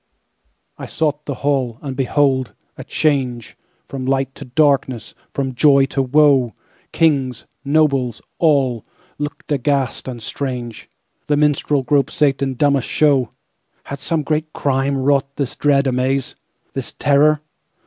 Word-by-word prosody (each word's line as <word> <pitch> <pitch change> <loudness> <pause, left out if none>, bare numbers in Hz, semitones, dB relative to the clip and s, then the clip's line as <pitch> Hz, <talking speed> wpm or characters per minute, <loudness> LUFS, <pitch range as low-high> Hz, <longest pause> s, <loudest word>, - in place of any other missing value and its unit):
I - - -6
sought 150 -2 -2
the 140 - -3
hall, 130 -5 0
And 135 -2 -5
behold!—a 135 -1 -1
changeFrom 130 -2 -3
light 135 -1 0
to - - -10
darkness, 130 -3 +1 0.2
from 135 -2 -3
joy 140 +1 +5
to 135 - +1
woe! 135 -3 +3 0.4
Kings, 135 -7 +1 0.2
nobles, 140 -5 +1 0.2
all, 135 -8 +2 0.4
Looked 145 +1 -6
aghast 140 -2 0
and 125 -2 -5
strange; 125 -2 -5 0.4
The 145 - +2
minstrel 145 -1 +1
group 140 +1 +2
sate 140 -3 +1
in 135 -1 -1
dumbest 140 -1 +2
show! 140 -6 +2 0.5
Had 140 - -7
some 160 +2 -1
great 155 +1 -2
crimeWrought 140 0 0
this 140 -4 -3
dread 140 -1 +2
amaze, 130 +1 -1 0.4
This - - -4
terror? 145 +1 +3
140 Hz, 125 wpm, -19 LUFS, 130-145 Hz, 0.5 s, joy